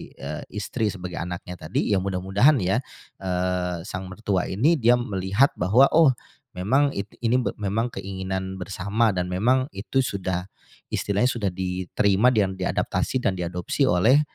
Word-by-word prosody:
eee, - - -6
istri 105 +2 -2
sebagai 90 -2 -6
anaknya 90 0 -6
tadi, 90 - 0
ya 100 - +3
mudah-mudahan 95 +9 +3
ya, 95 +6 +2 0.4
eee, 90 -2 -1
sang 95 -2 -5
mertua 100 -2 -1
ini 135 - +3
dia 120 0 +5
melihat 100 +3 +1
bahwa, 110 +10 +5
oh 160 -3 +6 0.5
memang 135 +10 +2
i 100 - -2 0.2
ini 120 +2 +3 0.2
memang 105 +4 0
keinginan 95 0 -4
bersama 100 +4 0
dan 90 0 -1
memang 125 +8 +2
itu 100 +7 -2
sudah, 95 -5 -3 0.4
istilahnya 105 +5 +1
sudah 110 -6 -1
diterima 95 +4 +1
dan 100 -4 +1
diadaptasi 125 +6 -1
dan 100 - +2
diadopsi 90 0 -1
oleh 110 +12 +5
95 Hz, 140 wpm, -24 LUFS, 90-115 Hz, 0.5 s, oh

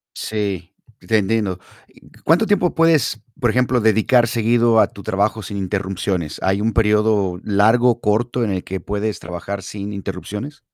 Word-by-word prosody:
Sí, 100 -4 -4 0.3
te 110 - +1
entiendo, 100 -3 0 0.6
¿cuánto 175 +8 +3
tiempo 185 -4 +2
puedes, 160 -8 +2 0.2
por 120 - +2
ejemplo, 125 0 +2
dedicar 110 +3 +3
seguido 115 0 +3
a - - +5
tu 100 - -13
trabajo 105 +2 -1
sin 100 +1 -6
interrupciones? 95 -4 -3
¿Hay 95 +1 +1
un 115 +1 0
periodo 105 -4 +2
largo 110 +4 +3
o 120 - -5
corto 120 +3 0
en 105 - -1
el 90 -1 -2
que 95 0 -5
puedes 105 +1 -3
trabajar 90 +3 -6
sin 100 +2 -6
interrupciones? 105 +8 -6
105 Hz, 155 wpm, -20 LUFS, 100-120 Hz, 0.6 s, a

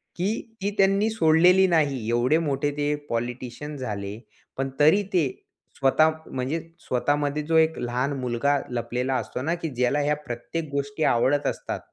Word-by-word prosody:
की 220 +5 -3
ती 200 +1 0
त्यांनी 195 +2 +3
सोडलेली 180 -1 +5
नाही. 140 -9 +1
एवढे 120 +6 +3
मोठे 145 -2 -1
ते 145 0 +1
पॉलिटिशियन 125 +5 -4
झाले, 105 -4 -5 0.4
पण 135 0 -1
तरी 160 +8 +5
ते 165 -6 +3 0.5
स्वतः 155 +4 +4 0.2
म्हणजे 130 +5 -2 0.2
स्वतःमध्ये 145 +3 0
जो 160 +2 -1
एक 160 0 +3
लहान 125 +3 -1
मुलगा 125 +3 +1
लपलेला 125 +2 -2
असतो 125 +1 -3
ना, 165 +5 0
की 165 -2 -4
ज्याला 125 +3 +1
ह्या 150 +1 +1
प्रत्येक 150 +7 -4
गोष्टी 140 +2 -2
आवडत 135 +5 +2
असतात, - - -3
145 Hz, 150 wpm, -25 LUFS, 125-160 Hz, 0.5 s, सोडलेली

